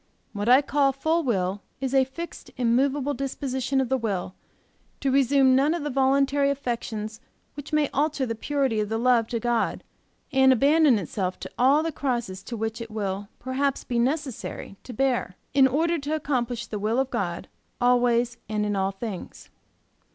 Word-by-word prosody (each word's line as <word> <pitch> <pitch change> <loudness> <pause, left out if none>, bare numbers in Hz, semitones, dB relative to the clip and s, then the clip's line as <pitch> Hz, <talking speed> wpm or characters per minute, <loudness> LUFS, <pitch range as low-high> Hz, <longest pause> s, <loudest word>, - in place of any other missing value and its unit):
What 205 +2 -2
I 260 +3 +7
call 280 0 +2
full 315 +5 +1
will 195 -5 -1 0.2
is 265 0 -3
a 265 -1 +5
fixed 335 +6 -8
immovable 265 +4 +1
disposition 270 -1 -2
of 265 - +1
the 265 +1 0
will 195 -5 -2 0.7
to 275 - 0
resume 270 0 +4
none 290 +5 +3
of 335 - -4
the 295 - -2
voluntary 275 +1 +2
affections 230 -5 -4 0.3
which 290 0 -9
may 305 -1 +2
alter 285 -1 0
the 230 - -2
purity 265 -1 -1
of 210 -1 -1
the 225 - -1
love 235 -1 +3
to 235 - -2
God 240 0 0 0.5
and 265 -1 +5
to 260 - +6
abandon 285 0 +4
itself 185 0 -3
to - - -7
all 275 +5 +4
the 330 - -1
crosses 240 -10 -3
which 225 0 -3
it 230 - -6
will 200 -2 -3
perhaps 265 +2 -1
be 240 -1 -1
necessary 265 -5 -3
to - - -7
bear, 245 -6 0 0.2
in 270 -1 +6
order 330 +5 +1
to 290 +2 -2
accomplish 245 -5 -2
the 210 -2 -5
will 215 +4 0
of 265 0 0
God 180 -8 -3 0.3
always 245 -1 +2
and 210 -1 0
in 205 -1 -1
all 195 0 +1
things. 195 -1 -7
255 Hz, 175 wpm, -25 LUFS, 225-275 Hz, 0.7 s, I